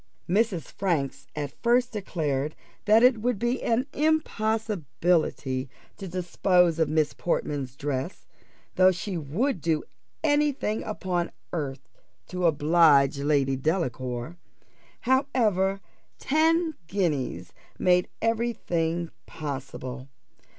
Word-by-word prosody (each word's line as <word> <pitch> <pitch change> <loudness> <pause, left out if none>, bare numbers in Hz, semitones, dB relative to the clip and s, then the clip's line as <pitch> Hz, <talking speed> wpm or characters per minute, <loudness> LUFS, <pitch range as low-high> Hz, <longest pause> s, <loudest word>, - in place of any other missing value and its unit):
Mrs. 195 -3 +1
Franks 145 -8 -2
at 145 -2 -4
first 245 +1 +3
declared 155 -8 -2 0.3
that 220 +2 +6
it 250 -3 +5
would 245 -1 0
be 240 +4 -1
an 235 +3 +1
impossibility 210 - 0 0.3
to 195 - -7
dispose 180 -1 +2
of 160 - +2
Miss 155 -1 +1
Portman's 140 -6 -2
dress, 140 +3 -4 0.5
though 185 0 +7
she 185 +2 -4
would 175 - -1
do 160 -1 0 0.4
any 295 -1 +3
thing 215 -4 -2
upon 180 -5 -2 0.2
earth 145 -5 -4 0.4
to 180 -1 +1
oblige 150 -3 +4
Lady 140 -2 +2
Delacour; 130 -1 -2 0.6
however, 230 -8 +2 0.4
ten 320 +2 +2
guineas 145 - -2 0.2
made 180 0 +3 0.2
every 230 +1 +1
thing 170 -3 -2 0.2
possible. 135 -3 -6
175 Hz, 105 wpm, -26 LUFS, 145-220 Hz, 0.6 s, though